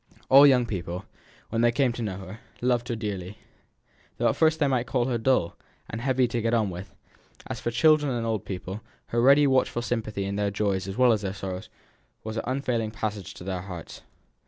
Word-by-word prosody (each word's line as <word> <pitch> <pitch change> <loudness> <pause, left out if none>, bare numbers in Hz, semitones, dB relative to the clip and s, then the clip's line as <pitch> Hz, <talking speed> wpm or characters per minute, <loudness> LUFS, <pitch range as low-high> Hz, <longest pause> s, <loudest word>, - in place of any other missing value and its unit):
All 140 +2 +9
young 125 -3 +4
people, 90 -4 -5 0.4
when 115 0 0
they 120 0 +4
came 130 0 +2
to 120 - -6
know 100 -5 -3
her, 95 +3 -9 0.2
loved 120 -1 +1
her 120 - -2
dearly, 100 -3 -5 0.8
though - - +2
at - - 0
first 160 -1 +3
they 150 - +3
might 125 -2 0
call 125 -3 +1
her 120 -2 -1
dull, 110 -8 +1 0.3
and 115 - -5
heavy 130 -1 +2
to 120 0 -1
get 115 +1 +1
on 110 -4 +1
with; 90 +3 -7 0.6
and - - -7
as - - -4
for - - -2
children 150 +3 +4
and 120 -2 -2
old 110 -3 -1
people, 95 +2 -6 0.3
her 120 - +1
ready 140 +4 +6
watchful 130 -3 +2
sympathy 110 -5 -2
in 100 +1 -3
their 105 0 +1
joys 100 -2 -1
as 95 - -5
well 125 -2 +5
as 105 - -1
their 95 -1 -3
sorrows 95 -2 -6 0.5
was 110 0 -5
an - - -1
unfailing 125 -4 -1
passage 110 -3 -5
to - - -10
their 95 -1 -3
hearts. 90 -3 -9
115 Hz, 215 wpm, -26 LUFS, 100-125 Hz, 0.8 s, All